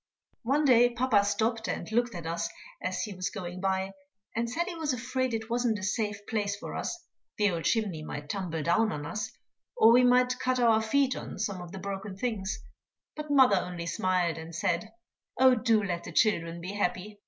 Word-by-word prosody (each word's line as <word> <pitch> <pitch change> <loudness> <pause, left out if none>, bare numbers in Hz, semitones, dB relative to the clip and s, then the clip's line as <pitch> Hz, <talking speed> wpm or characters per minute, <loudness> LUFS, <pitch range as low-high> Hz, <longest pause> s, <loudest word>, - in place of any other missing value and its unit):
One 280 +5 +1
day 245 -2 +6
papa 240 -4 +2
stopped 220 +3 0
and - - -4
looked 240 -1 +1
at 170 -2 -6
us 170 0 -2 0.3
as 185 0 -2
he 210 - -5
was 185 0 -3
going 185 -3 -6
by, 190 0 0 0.4
and 230 +1 0
said 335 +8 -1
he 365 - -5
was 315 -4 -1
afraid 255 +1 -1
it 220 -1 -3
wasn't 240 -1 +1
a 205 - -7
safe 205 +1 -2
place 205 -2 -1
for 200 - -7
us, 350 0 -4 0.3
the 210 -2 +3
old 165 -2 -3
chimney 205 -9 +1
might 145 -1 -6
tumble 165 -3 -3
down 215 +7 +2
on 145 -1 -4
us, 210 +7 -4 0.5
or 225 - +7
we 250 +2 +6
might 250 0 +4
cut 255 0 0
our 225 -2 +4
feet 265 +4 +2
on - - -7
some 195 -3 -2
of 175 -1 -9
the 195 - -7
broken 195 0 -5
things; 215 -2 -2 0.6
but 300 0 -6
mother 265 -8 +6
only 180 -1 -4
smiled 175 -1 0
and 160 +1 -8
said, 185 +4 -1 0.5
"Oh, 260 0 +7
do 225 -3 +2
let 175 -3 -2
the - - -7
children 170 -6 +1
be 180 +3 -5
happy." 205 +1 -2
210 Hz, 200 wpm, -29 LUFS, 185-240 Hz, 0.6 s, or